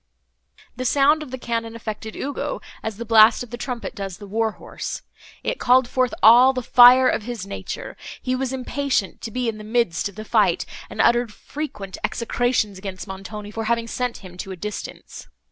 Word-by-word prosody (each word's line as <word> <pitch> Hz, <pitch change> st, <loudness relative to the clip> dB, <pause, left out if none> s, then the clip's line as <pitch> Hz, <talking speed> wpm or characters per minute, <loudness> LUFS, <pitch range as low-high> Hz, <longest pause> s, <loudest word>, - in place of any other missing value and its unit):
The 255 Hz, -, -4 dB
sound 285 Hz, +4 st, +4 dB
of 305 Hz, -, -7 dB
the 260 Hz, -, -5 dB
cannon 230 Hz, -2 st, -3 dB
affected 220 Hz, -1 st, -6 dB
Ugo, 285 Hz, -, -3 dB, 0.2 s
as 220 Hz, -2 st, -4 dB
the 235 Hz, -, -5 dB
blast 220 Hz, +1 st, +6 dB
of 240 Hz, -, -12 dB
the -, -, -4 dB
trumpet 245 Hz, -1 st, -5 dB
does 195 Hz, -3 st, -6 dB
the 205 Hz, -, -10 dB
war 220 Hz, +2 st, 0 dB
horse; -, -, -7 dB, 0.4 s
it -, -, -2 dB
called 255 Hz, 0 st, +4 dB
forth 255 Hz, 0 st, +1 dB
all 245 Hz, +4 st, +8 dB
the 255 Hz, -1 st, -3 dB
fire 250 Hz, +2 st, +8 dB
of -, -, +1 dB
his 230 Hz, -2 st, -5 dB
nature; 200 Hz, -, -6 dB, 0.2 s
he 255 Hz, -, -2 dB
was 260 Hz, 0 st, -2 dB
impatient 260 Hz, -, -1 dB
to -, -, -5 dB
be 250 Hz, +2 st, -2 dB
in 220 Hz, -1 st, -3 dB
the -, -, -8 dB
midst 215 Hz, -4 st, 0 dB
of 200 Hz, -, -16 dB
the 215 Hz, +1 st, -7 dB
fight, -, -, +2 dB, 0.2 s
and -, -, -1 dB
uttered 240 Hz, -1 st, +3 dB
frequent 210 Hz, -5 st, -7 dB
execrations 235 Hz, -4 st, 0 dB
against 190 Hz, 0 st, -7 dB
Montoni 205 Hz, +2 st, -7 dB
for 225 Hz, +1 st, -4 dB
having 230 Hz, +1 st, +1 dB
sent 250 Hz, +1 st, -2 dB
him 180 Hz, -1 st, -11 dB
to 195 Hz, -, -6 dB
a 190 Hz, -, -5 dB
distance. 210 Hz, +3 st, -7 dB
230 Hz, 195 wpm, -23 LUFS, 210-255 Hz, 0.4 s, all